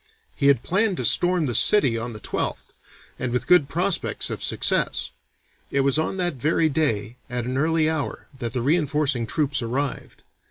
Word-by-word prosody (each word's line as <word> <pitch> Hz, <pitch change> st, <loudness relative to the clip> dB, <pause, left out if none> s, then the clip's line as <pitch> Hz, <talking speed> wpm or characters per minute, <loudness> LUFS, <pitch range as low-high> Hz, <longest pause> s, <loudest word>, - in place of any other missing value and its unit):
He 140 Hz, -, +1 dB
had 140 Hz, -4 st, +4 dB
planned 195 Hz, 0 st, +1 dB
to -, -, -2 dB
storm 175 Hz, -2 st, +2 dB
the 125 Hz, -, -2 dB
city 135 Hz, -, +4 dB
on 115 Hz, +1 st, -4 dB
the 105 Hz, -, -8 dB
12th, -, -, -4 dB, 0.5 s
and 125 Hz, -1 st, -2 dB
with 125 Hz, -, -1 dB
good 175 Hz, -6 st, +4 dB
prospects 175 Hz, +3 st, -1 dB
of -, -, -5 dB
success; -, -, 0 dB, 0.6 s
it 140 Hz, -, +1 dB
was 140 Hz, +2 st, +2 dB
on 160 Hz, +4 st, -2 dB
that 175 Hz, -1 st, -1 dB
very 155 Hz, +4 st, +1 dB
day 120 Hz, -7 st, -1 dB
at 120 Hz, -1 st, -3 dB
an 125 Hz, +1 st, -3 dB
early 160 Hz, +3 st, +2 dB
hour, 155 Hz, -3 st, -3 dB
that 115 Hz, -2 st, -4 dB
the 125 Hz, -3 st, -2 dB
reinforcing 145 Hz, -4 st, +1 dB
troops 140 Hz, +2 st, 0 dB
arrived. 130 Hz, +4 st, -4 dB
140 Hz, 175 wpm, -23 LUFS, 125-160 Hz, 0.6 s, had